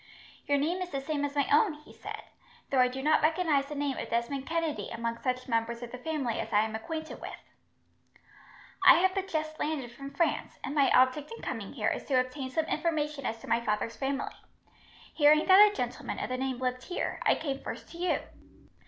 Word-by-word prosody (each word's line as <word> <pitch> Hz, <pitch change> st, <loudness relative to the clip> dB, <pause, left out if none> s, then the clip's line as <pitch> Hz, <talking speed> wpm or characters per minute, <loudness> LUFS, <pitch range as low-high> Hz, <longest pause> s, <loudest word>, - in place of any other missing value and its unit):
"Your 285 Hz, -, +3 dB
name 335 Hz, +6 st, 0 dB
is 365 Hz, -, -3 dB
the 275 Hz, -, -2 dB
same 290 Hz, +1 st, -2 dB
as 285 Hz, 0 st, -2 dB
my 285 Hz, -2 st, +2 dB
own," 310 Hz, +4 st, +5 dB
he 300 Hz, 0 st, -16 dB
said, -, -, -7 dB, 0.5 s
"though 270 Hz, -, +3 dB
I 250 Hz, -, +6 dB
do 260 Hz, +2 st, -5 dB
not 310 Hz, +1 st, +4 dB
recognize 310 Hz, -3 st, +2 dB
the 295 Hz, -, -6 dB
name 285 Hz, -2 st, -1 dB
of -, -, -5 dB
Desmond 265 Hz, +4 st, -1 dB
Kennedy 330 Hz, -2 st, -1 dB
among 230 Hz, 0 st, -3 dB
such 255 Hz, -1 st, -2 dB
members 230 Hz, 0 st, -1 dB
of 235 Hz, -, -7 dB
the 250 Hz, -, -7 dB
family 275 Hz, -5 st, -2 dB
as 225 Hz, -, -4 dB
I 210 Hz, -1 st, +5 dB
am 220 Hz, 0 st, -2 dB
acquainted 315 Hz, +8 st, -5 dB
with." -, -, -7 dB, 1.4 s
"I 370 Hz, -, +10 dB
have 375 Hz, +2 st, +3 dB
but 390 Hz, -1 st, -2 dB
just 310 Hz, -3 st, -3 dB
landed 285 Hz, -6 st, -2 dB
from 275 Hz, +3 st, -8 dB
France, 335 Hz, +3 st, -1 dB
and 275 Hz, -, -3 dB
my 280 Hz, -2 st, +4 dB
object 260 Hz, -, +3 dB
in -, -, -14 dB
coming -, -, -4 dB
here -, -, 0 dB
is -, -, -3 dB
to 260 Hz, -3 st, +3 dB
obtain 260 Hz, +1 st, -3 dB
some 315 Hz, +5 st, 0 dB
information 300 Hz, -4 st, -1 dB
as 225 Hz, -, -3 dB
to -, -, -11 dB
my 230 Hz, +1 st, +2 dB
father's 215 Hz, +1 st, -1 dB
family. 275 Hz, 0 st, -2 dB, 0.8 s
Hearing 305 Hz, 0 st, +5 dB
that 405 Hz, +2 st, +8 dB
a -, -, -10 dB
gentleman -, -, -3 dB
of -, -, -3 dB
the 255 Hz, -, -1 dB
name 260 Hz, -1 st, -2 dB
lived 255 Hz, 0 st, -2 dB
here, 360 Hz, -, -3 dB
I -, -, +4 dB
came 275 Hz, -3 st, -3 dB
first -, -, -7 dB
to 340 Hz, -, -10 dB
you. 360 Hz, 0 st, +1 dB
280 Hz, 215 wpm, -30 LUFS, 255-315 Hz, 1.4 s, I